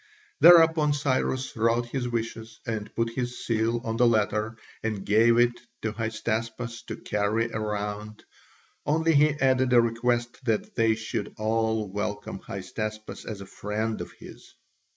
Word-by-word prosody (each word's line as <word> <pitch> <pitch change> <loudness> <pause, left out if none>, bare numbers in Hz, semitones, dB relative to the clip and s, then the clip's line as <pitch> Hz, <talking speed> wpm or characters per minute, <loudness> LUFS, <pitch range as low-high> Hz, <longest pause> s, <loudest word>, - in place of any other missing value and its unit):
Thereupon 160 -3 +7
Cyrus 130 -2 -1
wrote 115 +1 +2
his 125 +1 -3
wishes 115 -1 -4
and 110 -2 -4
put 115 0 0
his 125 0 -4
seal 115 +1 +1
on 115 0 -2
the 125 - +5
letter, 110 0 +1 0.2
and 110 -3 -3
gave 115 +3 +5
it 120 0 +5 0.3
to 110 - 0
Hystaspas 115 +1 -3
to - - -4
carry 105 +3 0
round, 105 -1 -4 0.6
only 160 +2 +2
he 150 +1 +6
added 130 -1 +3
a 120 - +8
request 120 +2 0
that 110 -3 0
they 115 -1 +3
should 110 0 -4
all 110 0 0
welcome 105 0 -4
Hystaspas 110 +3 -6
as 105 -3 -6
a - - -7
friend 105 +3 -3
of - - -7
his. - - -14
115 Hz, 145 wpm, -27 LUFS, 110-120 Hz, 0.6 s, a